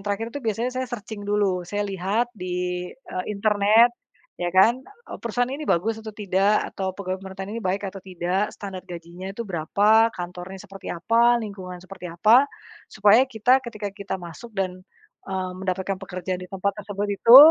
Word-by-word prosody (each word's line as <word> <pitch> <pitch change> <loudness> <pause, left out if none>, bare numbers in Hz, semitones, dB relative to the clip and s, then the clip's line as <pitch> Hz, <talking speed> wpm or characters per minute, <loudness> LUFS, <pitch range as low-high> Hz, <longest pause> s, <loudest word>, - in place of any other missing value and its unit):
terakhir 205 +3 -3
itu 285 - -4
biasanya 230 +2 -1
saya 255 0 -2
searching 220 -3 -6
dulu 205 -3 +1
saya 205 0 -1
lihat 200 +5 -1
di, 180 -2 -3
eee, 185 -8 -7
internet 210 +3 +4 0.5
ya 175 - 0
kan 225 +8 +5 0.4
perusahaan 240 +1 0
ini 295 +2 -4
bagus 220 +6 +1
atau 220 0 -7
tidak 200 +1 +2
atau 190 -1 -2
pegawai 185 -1 -4
pemerintahan 195 +1 -7
ini 230 - -3
baik 195 +2 -1
atau 195 0 -7
tidak 185 +2 -1
standar 195 -3 -7
gajinya 175 +2 -8
itu 230 +4 -5
berapa 205 +6 +4
kantornya 180 +1 -7
seperti 195 -1 -10
apa, 235 +6 +3
lingkungan 190 -5 -6
seperti 185 -1 -9
apa, 225 +11 +5 0.4
supaya 210 +3 +6
kita 250 +3 +3
ketika 215 -4 -5
kita 200 -1 -5
masuk 175 +6 -10
dan, 185 -1 -2 0.5
eee, 190 -1 -2
mendapatkan 190 0 -2
pekerjaan 185 -1 -4
di 180 - -8
tempat 195 +1 -1
tersebut 205 0 -3
itu 230 +5 +8
200 Hz, 165 wpm, -24 LUFS, 185-220 Hz, 0.5 s, itu